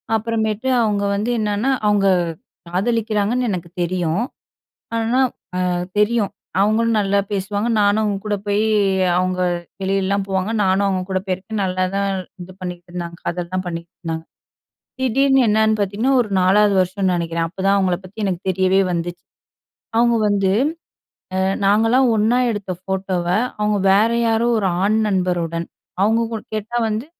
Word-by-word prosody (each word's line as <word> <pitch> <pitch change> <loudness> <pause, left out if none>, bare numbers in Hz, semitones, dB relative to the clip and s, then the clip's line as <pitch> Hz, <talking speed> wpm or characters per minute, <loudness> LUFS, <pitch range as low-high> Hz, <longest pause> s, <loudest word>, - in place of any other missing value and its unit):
அப்புறமேட்டு 220 +1 -1
அவுங்க 205 -2 +1
வந்து 215 +4 -1
என்னன்னா, 210 +5 0 0.2
அவுங்க 205 -1 +3 0.6
காதலிக்கிறாங்கன்னு 220 +4 0
எனக்கு 175 -2 -4
தெரியும். 175 +3 0 0.7
ஆனா 230 +3 +1 0.5
அ - - +1 0.3
தெரியும். 210 -1 +2 0.3
அவங்களும் 220 +2 +2
நல்லா 200 0 +1
பேசுவாங்க, 205 +3 -1
நானும் 205 +1 +3
அவுங்க 205 -2 0
கூட 205 -1 0
போய் 205 +1 +1 0.6
அவங்க 185 0 0 0.4
வெளியல்லாம் 195 +1 0
போவாங்க, 190 +2 -1
நானும் 190 +1 +2
அவங்க 190 -1 0
கூட 185 0 0
போயிருக்கேன், 190 +3 -3
நல்லாதான் 185 +2 -1 0.3
இது 185 +1 -10
பண்ணீகிட்டுருந்தாங்க 175 -1 -6
காதல்லாம் 180 +2 -3
பண்ணிகிட்ருந்தாங்க. 165 -1 -6 0.8
திடீர்ன்னு 270 +1 +3
என்னன்னு 220 0 +3
பாத்தீங்கன்னா, 210 +7 0
ஒரு 215 - -4
4ஆவது 200 +2 +4
வருஷம்ன்னு 185 0 0
நெனைக்கிறேன், 165 -1 -1
அப்பதான் 195 +2 +1
அவங்கள 185 -2 +1
பத்தி 205 +3 -7
எனக்கு 185 -2 -2
தெரியவே 190 +1 +3
வந்துச்சு. 175 0 -4 0.7
அவுங்க 235 0 +4
வந்து 195 -2 +2 0.9
அ - - +1 0.3
நாங்கல்லாம் 225 +6 +4
ஒண்ணா 225 +4 +3
எடுத்த 205 -4 -3
ஃபோட்டோவ, 190 -2 -2 0.3
அவங்க 210 -1 +1
வேற 215 +4 +4 0.2
யாரோ 225 +1 +2
ஒரு 195 -3 +1
ஆண் 215 +2 +2
நண்பருடன் 175 -3 -1 0.4
அவங்க 225 +3 +3
கு 220 - -2 0.2
கேட்டா 220 +3 -4
வந்து, 220 +6 -3
200 Hz, 130 wpm, -20 LUFS, 185-220 Hz, 0.9 s, 4ஆவது